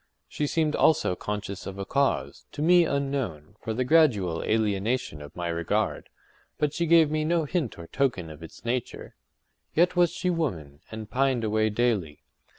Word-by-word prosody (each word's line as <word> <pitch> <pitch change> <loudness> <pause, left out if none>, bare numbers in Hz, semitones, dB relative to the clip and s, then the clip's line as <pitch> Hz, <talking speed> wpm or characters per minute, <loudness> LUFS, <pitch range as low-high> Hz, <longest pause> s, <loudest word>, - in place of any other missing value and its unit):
She 150 - -2
seemed, 155 0 +1
also, 155 - +3
conscious 105 0 -5
of 95 0 -6
a 100 - -4
cause, 140 +4 -1
to 145 - -3
me 175 +1 +6
unknown, 135 - -2
for 115 - -4
the 120 +4 0
gradual 120 - +3
alienation 110 -4 0
of 75 -1 -11
my 90 -1 -3
regard; 85 -1 -1 0.5
but 150 -1 0
she 170 +1 -1
gave 165 -2 +5
me 155 0 0
no 165 0 +1
hint 150 - -2
or 85 - -8
token 95 - -1
of 75 +1 -12
its 80 +7 -12
nature. 120 0 -3 0.6
Yet 175 +3 +3
was 175 -1 +4
she 180 - -1
woman, 85 - -3
and 110 -1 -7
pined 130 0 +1
away 110 0 +1
daily. 105 -9 -1
120 Hz, 170 wpm, -26 LUFS, 95-155 Hz, 0.6 s, me